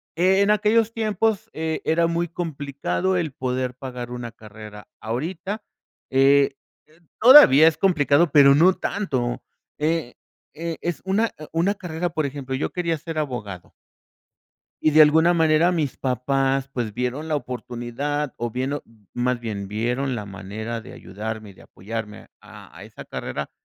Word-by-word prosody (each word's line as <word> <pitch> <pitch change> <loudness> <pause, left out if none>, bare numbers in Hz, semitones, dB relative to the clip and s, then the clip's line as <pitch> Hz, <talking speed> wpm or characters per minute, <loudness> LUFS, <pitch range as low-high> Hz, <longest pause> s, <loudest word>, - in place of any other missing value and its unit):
En 190 +4 +3
aquellos 215 +2 +2
tiempos, 220 -1 -1
eh, 160 0 -3
era 165 +1 +2
muy 170 +1 -1
complicado, 150 - -2
el 165 -4 -2
poder 125 -1 -2
pagar 125 -2 -7
una 120 -1 -6
carrera. 105 -1 -12
Ahorita 170 - -4 0.5
eh 135 +1 +4 0.3
eh 155 +2 -25 0.2
todavía 215 - +9
es 160 - +2
complicado, 160 -4 +3
pero 140 -2 +7
no 175 +6 +5
tanto. 130 -16 -2 0.4
Eh 155 -4 -1 0.4
eh, 165 +1 -4
es 170 -2 -3
una 200 +4 +2
e 155 - -10
una 175 +5 +1
carrera 175 -2 -4
Por 160 -2 -2
ejemplo, 135 -1 -6
yo 130 - -2
quería 170 -2 -1
ser 165 +1 -7
abogado. 110 - -5 1.1
Y, 155 - +4
de 155 +1 +8
alguna 160 +3 +5
manera, 165 +2 +3
mis 155 -6 -1
papás, 135 +1 0
pues, 115 -4 -3
vieron 125 +6 -3
la 155 - -1
oportunidad, 125 +2 -4
o 120 0 -3
vieron 130 +5 -2 0.3
Más 125 0 -1
bien, 105 -4 -5
vieron 120 +6 -2
la 105 -3 -4
manera 105 +4 -6
de - - -12
ayudarme, 110 +2 -7
y - - -13
de - - -17
apoyarme 105 +1 -7
a - - -14
a - - -10
esa - - -11
carrera, 75 0 -5
140 Hz, 150 wpm, -23 LUFS, 120-170 Hz, 1.1 s, todavía